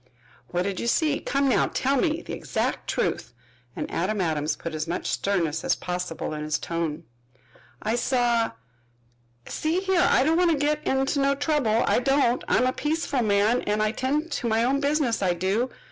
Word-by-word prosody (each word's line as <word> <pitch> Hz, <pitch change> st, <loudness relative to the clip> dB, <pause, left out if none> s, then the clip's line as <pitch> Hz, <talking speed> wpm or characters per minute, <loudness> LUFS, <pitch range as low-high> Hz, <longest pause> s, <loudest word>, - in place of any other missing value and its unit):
"What 175 Hz, 0 st, 0 dB
did 195 Hz, -1 st, -3 dB
you -, -, -3 dB
see? 300 Hz, +3 st, +2 dB
Come 275 Hz, 0 st, 0 dB
now, 260 Hz, -, +3 dB
tell 270 Hz, +2 st, 0 dB
me 315 Hz, +4 st, 0 dB
the -, -, -7 dB
exact -, -, -2 dB
truth," -, -, -1 dB, 0.4 s
and -, -, -3 dB
Adam 200 Hz, +5 st, -1 dB
Adams 155 Hz, -4 st, 0 dB
put 165 Hz, -, -6 dB
as 155 Hz, +1 st, -3 dB
much 175 Hz, +2 st, -2 dB
of -, -, -3 dB
sternness 165 Hz, -6 st, 0 dB
as -, -, +2 dB
possible 180 Hz, -3 st, -4 dB
in 150 Hz, 0 st, -4 dB
his 155 Hz, 0 st, 0 dB
tone. 165 Hz, -3 st, -3 dB, 0.8 s
"I 215 Hz, -, 0 dB
saw 240 Hz, -2 st, +1 dB, 0.9 s
See 320 Hz, +3 st, -1 dB
here, 380 Hz, -2 st, +2 dB
I -, -, +4 dB
don't 320 Hz, +4 st, +2 dB
want 355 Hz, -1 st, +4 dB
to 320 Hz, -, +2 dB
get 300 Hz, +1 st, 0 dB
in 265 Hz, 0 st, +2 dB, 0.2 s
no 275 Hz, 0 st, +2 dB
trouble, 280 Hz, -6 st, +1 dB
I -, -, +3 dB
don't. 255 Hz, -1 st, +2 dB
I'm 255 Hz, -, +3 dB
a 255 Hz, -, +1 dB
peaceful 295 Hz, -3 st, -1 dB
man, 215 Hz, +2 st, +2 dB
an' 210 Hz, +1 st, -1 dB
I 215 Hz, 0 st, +2 dB
tend 295 Hz, +7 st, -1 dB
to 245 Hz, -, -2 dB
my 225 Hz, 0 st, +2 dB
own 270 Hz, +3 st, +2 dB
business, 285 Hz, -5 st, +1 dB
I 180 Hz, -2 st, +1 dB
do. 195 Hz, +8 st, 0 dB
240 Hz, 190 wpm, -25 LUFS, 185-285 Hz, 0.9 s, I